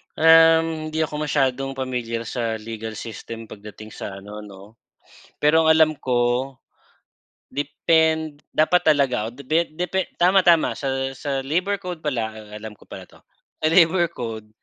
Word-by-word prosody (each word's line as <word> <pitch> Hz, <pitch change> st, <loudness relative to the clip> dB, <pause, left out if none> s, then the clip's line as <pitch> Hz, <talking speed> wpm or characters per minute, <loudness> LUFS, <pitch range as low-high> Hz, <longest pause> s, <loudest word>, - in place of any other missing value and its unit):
Um, 160 Hz, 0 st, +5 dB
hindi 160 Hz, 0 st, -1 dB
ako 150 Hz, -1 st, -4 dB
masyadong 135 Hz, -1 st, 0 dB
pamilyar 125 Hz, -3 st, -3 dB
sa 115 Hz, -1 st, -3 dB
legal 110 Hz, 0 st, -7 dB
system 115 Hz, 0 st, -8 dB
pagdating 105 Hz, +1 st, -11 dB
sa 95 Hz, -, -7 dB
ano 105 Hz, +2 st, -9 dB
'no. 105 Hz, +1 st, -13 dB, 0.6 s
Pero 160 Hz, +2 st, +3 dB
ang -, -, +3 dB
alam 160 Hz, -1 st, +5 dB
ko 125 Hz, +1 st, 0 dB, 1.0 s
depend 160 Hz, +2 st, +1 dB, 0.2 s
dapat 175 Hz, +3 st, +3 dB
talaga 125 Hz, -6 st, 0 dB
o 115 Hz, -, -8 dB
depe 155 Hz, +4 st, -1 dB
depe 180 Hz, +3 st, -2 dB
tama-tama 175 Hz, -2 st, +3 dB
sa 135 Hz, -1 st, -2 dB
sa 135 Hz, -2 st, -2 dB
labor 180 Hz, +8 st, -1 dB
code 180 Hz, -2 st, -5 dB
pala, 125 Hz, -8 st, -2 dB
ah, 110 Hz, -1 st, -12 dB
alam 105 Hz, -1 st, -9 dB
ko -, -, -20 dB
pala -, -, -11 dB
'to. -, -, -19 dB, 0.4 s
Sa 155 Hz, -, -1 dB
labor 170 Hz, 0 st, +5 dB
code, 110 Hz, -3 st, -6 dB
135 Hz, 150 wpm, -22 LUFS, 115-160 Hz, 1.0 s, Um